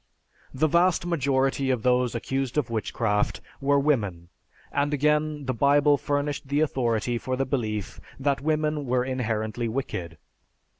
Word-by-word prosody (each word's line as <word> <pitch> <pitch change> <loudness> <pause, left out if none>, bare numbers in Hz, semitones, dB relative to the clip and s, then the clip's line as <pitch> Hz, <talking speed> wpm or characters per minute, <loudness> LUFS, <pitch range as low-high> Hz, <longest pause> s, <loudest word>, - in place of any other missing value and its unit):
The 135 +4 +1
vast 170 +2 +3
majority 135 -4 +1
of 125 -4 0
those 125 -1 +2
accused 135 +3 -2
of 135 -6 0
witchcraft 105 -1 0 0.2
were 140 +1 +3
women, 105 - 0 0.4
and 145 +1 +1
again 150 0 +1
the 130 - -1
Bible 145 +3 +4
furnished 145 0 -2
the 145 +2 +1
authority 120 -5 0
for 130 +2 -2
the 135 +1 0
belief 110 -7 -3 0.2
that 140 0 0
women 150 -1 0
were 125 0 +1
inherently 115 -2 -2
wicked. 90 - -4
135 Hz, 140 wpm, -26 LUFS, 120-145 Hz, 0.4 s, Bible